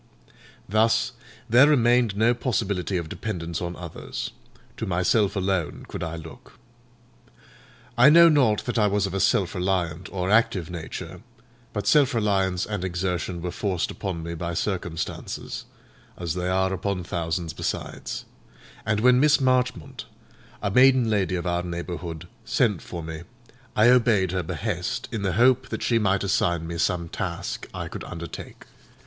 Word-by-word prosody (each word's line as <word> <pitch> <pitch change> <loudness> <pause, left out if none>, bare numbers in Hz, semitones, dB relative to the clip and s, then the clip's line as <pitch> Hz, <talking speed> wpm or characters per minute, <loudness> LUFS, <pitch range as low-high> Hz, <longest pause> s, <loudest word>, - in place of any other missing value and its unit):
Thus, 110 +4 +2 0.4
there 125 +5 +6
remained 120 -6 +3
no 115 +3 +4
possibility 100 -6 -1
of 85 -2 -3
dependence 85 -3 -4
on 85 0 -4
others; 85 -3 -6 0.5
to - - -4
myself 95 +4 +2
alone 95 -5 -1
could - - -6
I 85 -1 -3
look. 85 +11 -11 1.4
I 125 +3 +7
know 170 +2 +8
not 130 -10 +3
that 120 -1 -1
I 105 - +4
was 100 0 +1
of 95 - -4
a 95 - -1
self 95 -1 +2
reliant 90 -2 -1
or 95 0 -2
active 95 -6 +2
nature; 85 -3 -7 0.5
but 105 - -3
self 140 -4 +4
reliance 95 -4 +1
and 105 -3 -4
exertion 90 -1 -2
were 90 - -2
forced 95 -4 -2
upon 90 -5 -4
me 85 +1 -5
by 85 +1 -4
circumstances, 85 -4 -4 0.5
as 85 -3 -3
they 90 0 -2
are 95 +1 +1
upon 95 0 -2
thousands 85 -1 -3
besides; - - -4 0.6
and 110 -1 +1
when 125 +1 +5
Miss 150 +1 +5
Marchmont, 130 - 0 0.6
a 100 - 0
maiden 125 0 +5
lady 95 -3 +1
of 85 - -3
our 90 0 0
neighbourhood, 85 -1 -5 0.2
sent 115 - +1
for 85 -2 -7
me, 80 0 -6 0.5
I 110 +3 +6
obeyed 115 -7 +4
her 95 0 0
behest, 80 - -3
in 110 - -3
the 95 -2 0
hope 130 +5 +3
that - - -4
she 115 -1 +2
might 100 -2 +1
assign 85 -4 +1
me 85 0 -5
some 85 0 0
task 85 +1 -4
I - - -5
could - - -7
undertake. 85 -1 -8
95 Hz, 155 wpm, -25 LUFS, 85-115 Hz, 1.4 s, know